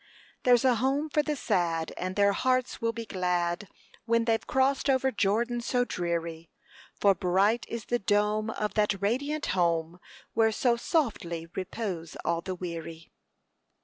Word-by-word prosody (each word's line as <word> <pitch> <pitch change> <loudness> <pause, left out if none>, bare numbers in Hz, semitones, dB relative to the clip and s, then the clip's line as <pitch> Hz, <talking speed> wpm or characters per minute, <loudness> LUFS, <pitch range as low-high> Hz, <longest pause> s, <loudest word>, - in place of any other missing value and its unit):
There's 245 0 +4
a 250 -2 +4
home 280 +4 0
for 300 - +3
the 300 0 -2
sad, 170 - 0
and 185 +1 -4
their 200 0 +4
hearts 255 +4 0
will 230 0 +1
be 230 0 -6
glad 180 -1 -1 0.4
When 230 0 +2
they've 225 -1 0
crossed 270 +1 +2
over 265 0 +3
Jordan 235 +4 0
so 245 +1 +1
dreary; 170 -4 -3 0.5
For 200 -1 +5
bright 195 +5 +1
is 230 -2 -5
the 240 - 0
dome 210 +2 +1
of 210 -2 -2
that 210 -2 +1
radiant 285 +10 -1
home 170 -1 0 0.3
Where 220 -1 +3
so 240 +2 +2
softly 200 - -1
repose 185 -4 -4
all 170 0 +1
the 185 +1 -4
weary." 165 -2 -7
210 Hz, 150 wpm, -28 LUFS, 175-240 Hz, 0.5 s, For